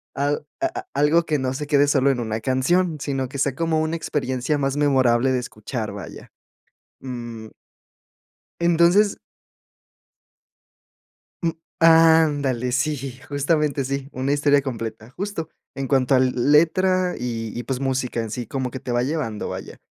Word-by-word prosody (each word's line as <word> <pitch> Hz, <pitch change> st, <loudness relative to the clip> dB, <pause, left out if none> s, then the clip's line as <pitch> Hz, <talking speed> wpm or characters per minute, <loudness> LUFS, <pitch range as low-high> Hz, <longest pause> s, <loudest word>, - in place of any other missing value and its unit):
Al 145 Hz, +1 st, -1 dB, 0.2 s
a 335 Hz, -, +3 dB
a 380 Hz, -, -10 dB
algo 160 Hz, +3 st, +3 dB
que 150 Hz, -3 st, 0 dB
no 130 Hz, 0 st, -1 dB
se 145 Hz, +2 st, -5 dB
quede 145 Hz, -1 st, +4 dB
solo 140 Hz, -1 st, +3 dB
en 125 Hz, -, -2 dB
una 110 Hz, -1 st, -3 dB
canción, 155 Hz, +8 st, +1 dB
sino 135 Hz, -3 st, -2 dB
que 140 Hz, -, -7 dB
sea 135 Hz, -1 st, 0 dB
como 165 Hz, -1 st, 0 dB
una 160 Hz, +1 st, -1 dB
experiencia 135 Hz, -2 st, -1 dB
más 135 Hz, 0 st, -1 dB
memorable 130 Hz, -3 st, +3 dB
de 130 Hz, -, +1 dB
escuchar, 110 Hz, -1 st, -5 dB
vaya, 100 Hz, -6 st, -9 dB, 0.7 s
mm 120 Hz, -4 st, -7 dB, 1.1 s
entonces 175 Hz, +4 st, +4 dB, 2.3 s
mm 165 Hz, -, +2 dB, 0.3 s
Ándale, 160 Hz, -6 st, +4 dB
sí, 130 Hz, -1 st, -2 dB
justamente 145 Hz, -1 st, 0 dB
sí, 140 Hz, +1 st, -3 dB
una 130 Hz, +2 st, -1 dB
historia 145 Hz, -1 st, +3 dB
completa, 115 Hz, -3 st, -6 dB
justo 190 Hz, 0 st, -4 dB, 0.3 s
en 135 Hz, -1 st, -3 dB
cuanto 135 Hz, -1 st, +3 dB
a -, -, +5 dB
l 130 Hz, 0 st, +3 dB
letra, 180 Hz, +7 st, +3 dB
y 115 Hz, -3 st, -3 dB
y, 120 Hz, -, -3 dB
pues, 135 Hz, -1 st, -3 dB
música 130 Hz, -3 st, -1 dB
en 110 Hz, -2 st, -5 dB
sí, 120 Hz, -1 st, -4 dB
como 130 Hz, -1 st, -3 dB
que 130 Hz, -, -6 dB
te 125 Hz, -, -5 dB
va 120 Hz, 0 st, +1 dB
llevando, 130 Hz, -7 st, -3 dB
vaya, -, -, -7 dB
135 Hz, 155 wpm, -22 LUFS, 125-155 Hz, 2.3 s, a